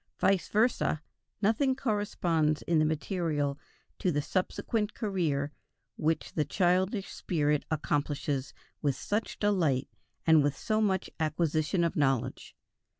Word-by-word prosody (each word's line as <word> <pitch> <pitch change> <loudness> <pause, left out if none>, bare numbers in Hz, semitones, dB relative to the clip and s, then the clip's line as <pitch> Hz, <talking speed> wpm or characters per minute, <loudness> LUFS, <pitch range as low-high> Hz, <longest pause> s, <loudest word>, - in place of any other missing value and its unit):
Vice 190 -4 +2
versa, 215 -8 +1 0.4
nothing 260 +6 +3
corresponds 175 - 0
in 165 -2 +2
the 155 - +4
material 155 -3 -1 0.4
to 180 - +1
the 145 - +1
subsequent 210 +4 -1
career 165 - -1 0.4
which 160 +1 -1
the 155 - +1
childish 190 +4 +1
spirit 150 -4 0
accomplishes 145 -2 -1 0.3
with 140 -3 +1
such 210 - -2
delight 170 -11 +1 0.4
and 160 -2 +6
with 145 0 0
so 215 0 0
much 190 -3 +1
acquisition 160 +2 +1
of 170 - 0
knowledge. 135 -4 0
165 Hz, 120 wpm, -30 LUFS, 150-195 Hz, 0.4 s, and